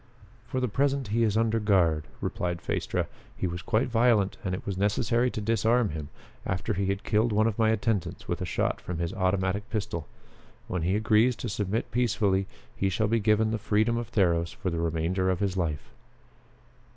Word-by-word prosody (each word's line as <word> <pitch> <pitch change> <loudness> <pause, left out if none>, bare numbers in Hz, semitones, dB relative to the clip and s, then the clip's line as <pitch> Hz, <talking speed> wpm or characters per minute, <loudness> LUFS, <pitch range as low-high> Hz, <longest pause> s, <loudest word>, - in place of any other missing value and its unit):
"For 130 - -2
the 125 - +1
present 135 +1 0
he 115 +3 +1
is 110 -2 +2
under 115 0 +2
guard," 85 -8 +2 0.2
replied 90 -1 -2
Phaestra. - - -1 0.3
"He - - -2
was 90 0 -3
quite 110 +8 +1
violent 115 -4 +3
and 95 -2 -1
it - - -8
was 100 - -2
necessary 105 +5 +1
to 110 - -4
disarm 115 +1 +2
him 75 -2 -6 0.3
after 95 +4 -2
he 100 0 -1
had 100 0 -1
killed 110 +2 +2
one 105 +1 +3
of 115 -1 -1
my 110 -1 +4
attendants 110 -4 -1
with - - -2
a - - -1
shot - - -1
from 90 - -5
his 85 +2 -2
automatic 95 +1 0
pistol. 100 -7 -3 0.6
When 90 - -2
he 90 +4 +1
agrees 110 +3 +3
to 120 - -5
submit 105 +2 -2
peacefully, 105 -5 +1 0.3
he 95 - 0
shall 110 +3 0
be 115 +2 +2
given 110 +1 +2
the 115 - -1
freedom 110 +3 +1
of 120 -1 -3
Theros 85 -4 +2
for 90 - -3
the 85 - -2
remainder 85 +3 0
of 90 -1 0
his 100 -2 0
life." 80 -7 -2
105 Hz, 195 wpm, -28 LUFS, 90-115 Hz, 0.6 s, my